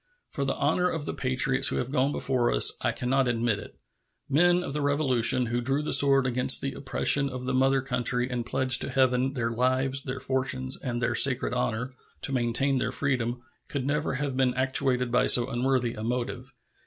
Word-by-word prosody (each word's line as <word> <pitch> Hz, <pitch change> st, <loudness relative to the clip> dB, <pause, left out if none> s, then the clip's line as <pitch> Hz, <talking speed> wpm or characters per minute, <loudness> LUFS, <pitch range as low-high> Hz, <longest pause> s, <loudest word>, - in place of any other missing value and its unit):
For 140 Hz, -, -3 dB
the 135 Hz, -, -2 dB
honor 170 Hz, +5 st, 0 dB
of 160 Hz, -4 st, -4 dB
the -, -, -4 dB
patriots 135 Hz, +1 st, +1 dB
who -, -, 0 dB
have 125 Hz, -, -3 dB
gone 140 Hz, 0 st, +1 dB
before 130 Hz, -4 st, 0 dB
us, -, -, +5 dB
I -, -, 0 dB
can 125 Hz, -, -5 dB
not 135 Hz, 0 st, +1 dB
admit 115 Hz, -3 st, -1 dB
it. -, -, -12 dB, 0.5 s
Men 175 Hz, +5 st, +2 dB
of 140 Hz, -, -6 dB
the 150 Hz, -, -2 dB
Revolution, 130 Hz, -3 st, +2 dB
who 120 Hz, +1 st, -2 dB
drew 135 Hz, +4 st, -1 dB
the -, -, -1 dB
sword 135 Hz, -2 st, +5 dB
against 125 Hz, +1 st, +3 dB
the 135 Hz, -, -4 dB
oppressions 140 Hz, +1 st, 0 dB
of 125 Hz, 0 st, -7 dB
the 130 Hz, -, -2 dB
mother 135 Hz, +1 st, +2 dB
country 125 Hz, -1 st, -1 dB
and 125 Hz, -2 st, -4 dB
pledged 130 Hz, +1 st, +1 dB
to -, -, -3 dB
Heaven 130 Hz, 0 st, +1 dB
"their 115 Hz, -3 st, -2 dB
lives, 130 Hz, +3 st, 0 dB
their 130 Hz, 0 st, -6 dB
fortunes, 130 Hz, 0 st, -2 dB
and 120 Hz, -2 st, -5 dB
their 120 Hz, -, 0 dB
sacred 130 Hz, 0 st, +2 dB
honor" 125 Hz, +1 st, -2 dB, 0.3 s
to 135 Hz, -, -2 dB
maintain 130 Hz, +2 st, +1 dB
their 110 Hz, 0 st, -2 dB
freedom, 125 Hz, -3 st, -2 dB, 0.2 s
could 140 Hz, -3 st, -4 dB
never 150 Hz, 0 st, -1 dB
have 140 Hz, -1 st, -3 dB
been 130 Hz, -1 st, +1 dB
actuated 130 Hz, -1 st, 0 dB
by 125 Hz, +1 st, +2 dB
so 120 Hz, 0 st, +5 dB
unworthy 125 Hz, -1 st, 0 dB
a 110 Hz, -, -7 dB
motive. 125 Hz, +2 st, -4 dB
130 Hz, 205 wpm, -26 LUFS, 125-135 Hz, 0.5 s, us